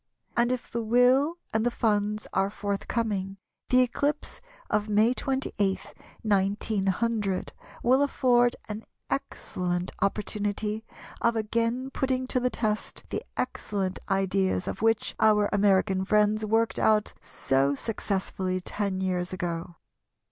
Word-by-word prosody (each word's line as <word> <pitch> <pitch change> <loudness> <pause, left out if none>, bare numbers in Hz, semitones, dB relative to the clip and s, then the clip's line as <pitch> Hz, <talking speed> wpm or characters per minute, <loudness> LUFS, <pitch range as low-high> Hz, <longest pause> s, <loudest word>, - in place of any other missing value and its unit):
And 240 +1 +3
if 255 -2 -3
the 235 - -1
will 250 +8 +4 0.2
and 220 0 +2
the 240 - +3
funds 210 -2 0
are 195 +1 +2
forthcoming, 200 -1 -2 0.3
the 255 0 +6
eclipse 285 +4 -1 0.3
of 210 0 0
May 215 +4 +4
28, 255 -8 -1 0.3
1900, 200 0 0 0.3
will 255 +3 +4
afford 245 -3 +3
an 215 +1 -5 0.3
excellent 180 -9 -2
opportunity 210 +1 -1 0.4
of 235 0 +3
again 230 +4 0
putting 260 -1 0
to 255 - +2
the 250 0 +1
test 215 -3 -2
the - - -1 0.2
excellent 195 -6 -2
ideas 195 -1 +1
of - - -4
which 225 -1 +2
our 210 -1 +5
American 195 -1 +3
friends 210 +2 +3
worked 225 +2 +1
out 215 -1 +3
so 135 +1 +1
successfully 190 -1 -2
ten 190 0 -2
years 180 -1 -1
ago. 170 -1 -4
210 Hz, 120 wpm, -27 LUFS, 195-235 Hz, 0.4 s, the